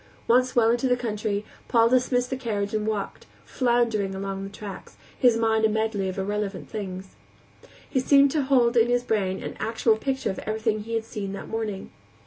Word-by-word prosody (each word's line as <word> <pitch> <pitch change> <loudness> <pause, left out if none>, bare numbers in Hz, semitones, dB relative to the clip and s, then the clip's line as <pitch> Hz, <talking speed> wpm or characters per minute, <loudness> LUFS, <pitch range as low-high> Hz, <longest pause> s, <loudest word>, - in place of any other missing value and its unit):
Once 250 +2 +3
well 230 -2 +5
into 240 +2 +1
the 250 -1 +2
country, 215 -3 -2 0.2
Paul 230 -1 +4
dismissed 250 0 +2
the - - 0
carriage 210 -5 -3
and 215 0 -1
walked, 210 -2 -3 0.2
floundering 235 -6 +1
along 195 0 -4
the 195 - -6
tracks, 200 -1 -9 0.2
his 245 -3 +4
mind 220 -1 +2
a 220 - +5
medley 215 -3 -1
of 185 - -6
irrelevant 200 0 -3
things. 190 -3 -5 0.8
He 260 - 0
seemed 275 +1 +5
to 305 - +1
hold 255 -3 +3
in 230 0 +5
his 245 0 +1
brain 195 -5 -1
an - - -6
actual 225 0 +1
picture 265 +1 -1
of 190 - -6
everything 215 0 -1
he 230 0 -3
had 225 -1 -1
seen 200 -3 -5
that 195 - -7
morning. 215 -3 -4
220 Hz, 190 wpm, -25 LUFS, 205-245 Hz, 0.8 s, well